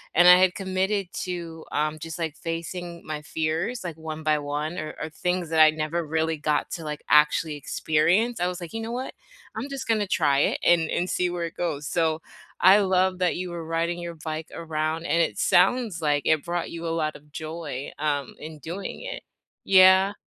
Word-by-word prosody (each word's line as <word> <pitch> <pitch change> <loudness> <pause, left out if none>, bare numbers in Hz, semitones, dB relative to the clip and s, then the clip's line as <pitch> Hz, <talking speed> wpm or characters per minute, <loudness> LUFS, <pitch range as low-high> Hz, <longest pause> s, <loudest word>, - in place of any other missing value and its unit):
and 175 +2 +7
I 180 0 +10
had 185 -1 +3
committed 190 +1 -1 0.2
to, 170 -3 -6
um, 155 +1 -1
just, 165 0 -6
like, 160 -3 -3
facing 170 +1 -5
my 155 -1 -4
fears, 160 +10 -2
like, 170 -3 -6
one 160 0 -6
by 155 -1 +2
one 150 +4 -3
or 155 - -5
or - - -3
things 180 +2 -2
that 160 -1 +1
I 155 0 +9
never 155 +2 -2
really 160 +1 0
got 150 0 0
to, 165 - -5
like, 150 0 -5
actually 150 +1 +4
experience. 170 +11 +1
I 180 - +1
was 180 -1 -4
like, 170 - -8
"You 225 - -3
know 225 +1 -5
what? 255 +2 -4 0.4
I'm 235 +6 -4
just 275 -1 -5
gonna 215 -3 +1
try 145 -6 +2
it - - +2
and 165 -2 +4
and 180 +1 -1
see 180 0 0
where 175 -1 -3
it 165 - -6
goes." 150 -4 -3
So, 160 -1 0 0.4
I 190 +3 +8
love 185 -1 +2
that 180 -1 +1
you 180 0 -4
were 170 -1 -6
riding 170 +1 -1
your 170 -1 -6
bike 155 0 -5
around, 160 0 -2
and 170 -1 +2
it 165 - -1
sounds 195 0 +3
like 145 -2 +1
it 155 -2 +3
brought 175 0 -2
you 170 0 -5
a - - -1
lot 155 0 -2
of 150 0 -23
joy, 155 -4 -5
um, 145 -3 -1
in 155 0 -8
doing 175 +7 -6
it. - - -6 0.4
Yeah. 190 +1 +6
165 Hz, 205 wpm, -25 LUFS, 155-180 Hz, 0.4 s, I